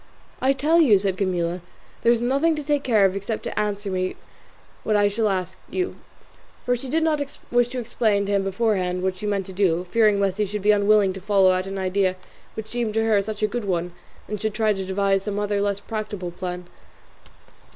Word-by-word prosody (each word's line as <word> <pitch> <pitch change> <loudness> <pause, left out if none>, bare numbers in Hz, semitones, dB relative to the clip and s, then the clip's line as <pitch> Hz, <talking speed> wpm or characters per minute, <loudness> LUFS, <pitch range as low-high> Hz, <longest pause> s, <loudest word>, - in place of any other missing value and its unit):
"I 265 +1 +3
tell 310 +5 +3
you," 230 -10 +6
said 190 -1 -1
Camilla, 180 -2 -1 0.4
"there 235 - +4
is 235 0 +1
nothing 280 +6 +2
to 300 - -4
take 290 0 +1
care 220 -7 +3
of 190 0 +1
except 200 +3 -4
to - - -3
answer 205 -1 -2
me 185 0 -1 0.7
what 215 - +1
I 205 0 +4
shall 210 +1 0
ask 185 -3 -3
you;" 370 0 -2 0.7
for 245 - +2
she 255 +2 -6
did 320 +4 +1
not 310 -2 +1 0.3
wish 245 0 +3
to 250 +1 -5
explain 220 -4 0
to 200 - -3
him 200 -1 +2
beforehand 190 -3 0
what 190 0 -1
she 210 - -5
meant 200 -2 -1
to 190 - -9
do, 180 -2 +1
fearing 215 -3 +4
lest 195 0 0
he 210 - +1
should 205 0 -5
be 210 - +5
unwilling 205 -1 +4
to 190 - -8
follow 195 -1 +4
out 185 +1 -1
an 195 0 -5
idea 190 0 +1 0.4
which 220 - -5
seemed 230 -2 -2
to 225 - +2
her 215 -3 +3
such 210 +1 -5
a - - +4
good 230 +1 -4
one, 175 -2 -2 0.3
and 210 -1 -5
should 215 -1 -2
try 215 -1 +2
or - - +3
devise 195 0 0
some 205 0 -4
other 205 -1 0
less 200 -1 0
practicable 210 -5 -5
plan. 180 0 -5
205 Hz, 220 wpm, -23 LUFS, 190-225 Hz, 0.7 s, you